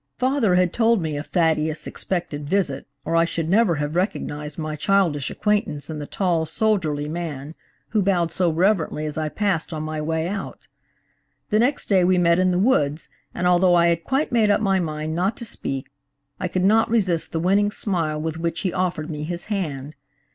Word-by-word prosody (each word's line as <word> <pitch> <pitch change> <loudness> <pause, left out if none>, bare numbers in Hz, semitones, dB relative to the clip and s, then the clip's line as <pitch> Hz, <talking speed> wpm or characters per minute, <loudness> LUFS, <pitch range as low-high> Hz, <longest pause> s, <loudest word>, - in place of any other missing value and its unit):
Father 255 -7 +2
had 180 -1 +2
told 230 -1 +3
me 160 -3 -3
of 145 +1 -5
Thaddeus' 160 -3 0
expected 155 -6 -4
visit, 180 -8 0 0.2
or 165 - -1
I 165 - +5
should 165 -1 -2
never 205 -4 +4
have 145 0 -3
recognized 150 -5 -2
my 155 -1 -3
childish 165 -4 +1
acquaintance 205 -9 -1
in 155 - -5
the 145 - -6
tall, 170 -4 0
soldierly 160 -6 0
man 155 -3 -5 0.4
who 215 - +1
bowed 180 -4 +1
so 180 -2 +1
reverently 165 -2 +1
as 150 - -4
I 155 -1 -1
passed 190 -3 -1
on 155 -1 -4
my 155 0 -3
way 160 +1 -1
out. 195 +1 -6 0.9
The 215 - +3
next 260 +5 +1
day 190 -3 +4
we 180 +1 +3
met 170 0 +3
in 185 0 +3
the 180 - +1
woods, 160 - +1 0.3
and 180 - -2
although 180 0 +4
I 170 0 +4
had 170 0 0
quite 270 - 0
made 225 -3 +3
up 205 - +4
my 195 -3 +2
mind 155 -2 -3
not 185 +6 0
to 235 - -5
speak, 135 - -4 0.5
I 185 - -1
could 185 +1 0
not 220 +3 +4
resist 190 -8 +1
the 165 - -1
winning 200 +4 +3
smile 170 -8 -2
with 160 +1 -3
which 165 0 -2
he 185 - -1
offered 180 -4 -1
me 150 -1 -5
his 170 +2 -4
hand. 150 -7 -3
170 Hz, 200 wpm, -23 LUFS, 155-195 Hz, 0.9 s, I